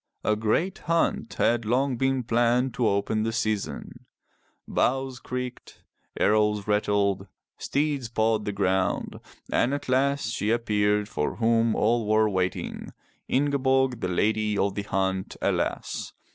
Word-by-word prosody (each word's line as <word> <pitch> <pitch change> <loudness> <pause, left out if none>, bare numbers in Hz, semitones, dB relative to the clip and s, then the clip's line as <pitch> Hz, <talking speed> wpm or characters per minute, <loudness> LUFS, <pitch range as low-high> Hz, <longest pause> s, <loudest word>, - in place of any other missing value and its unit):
A 105 - +2
great 110 - 0
hunt 165 -7 0
had 120 0 +2
long 125 +4 +1
been 135 +1 0
planned 120 +2 +2
to 120 - +1
open 100 +2 0
the 115 +1 0
season. 110 -3 -3 0.6
Bows 130 -1 0
creaked, 125 0 -6 0.4
arrows 105 -1 +2
rattled, 100 -2 +1 0.3
steeds 140 -4 -1
pawed 110 -1 +1
the 105 - -1
ground, 95 -2 0 0.3
and 130 +4 +2
at 145 - -6
last 135 -2 +1
she 105 - -1
appeared 105 -3 +1
for 75 - -2
whom 115 0 +2
all 115 0 +1
were 110 0 +4
waiting— 95 -3 -3 0.3
Ingeborg, 135 -2 +1
the 90 - -2
Lady 105 +3 +1
of 100 0 +1
the 100 - -3
Hunt, 95 -1 -2
alas! - - -2
110 Hz, 130 wpm, -26 LUFS, 105-125 Hz, 0.6 s, were